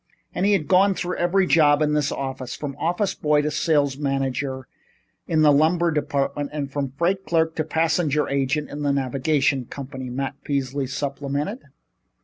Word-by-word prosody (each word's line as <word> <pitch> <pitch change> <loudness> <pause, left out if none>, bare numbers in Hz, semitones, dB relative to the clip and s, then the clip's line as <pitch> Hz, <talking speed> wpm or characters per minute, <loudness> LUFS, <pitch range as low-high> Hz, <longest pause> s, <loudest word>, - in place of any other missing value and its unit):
"And 190 - 0
he 205 - +4
had 170 -7 0
gone 190 +1 +4
through 180 0 -3
every 185 +2 +2
job 150 -4 +4
in 150 -1 +1
this 150 -2 +1
office, 130 -2 -4
from 140 -2 -5
office 175 +6 0
boy 150 -1 +1
to 150 - -1
sales 145 -4 +1
manager 135 -2 -2 0.6
in 155 -2 +2
the 150 - +7
lumber 165 +4 +3
department 145 -1 -1
and 145 -2 -4
from 140 -2 -2
freight 185 +4 +1
clerk 160 -3 +1
to 155 - +1
passenger 160 -1 +1
agent 140 +2 -1
in 145 - -6
the 145 -1 +1
navigation 135 0 +1
company," 130 0 -7
Matt 135 +2 -4
Peasley 140 -1 -2
supplemented. 140 - -3
145 Hz, 165 wpm, -23 LUFS, 135-160 Hz, 0.6 s, the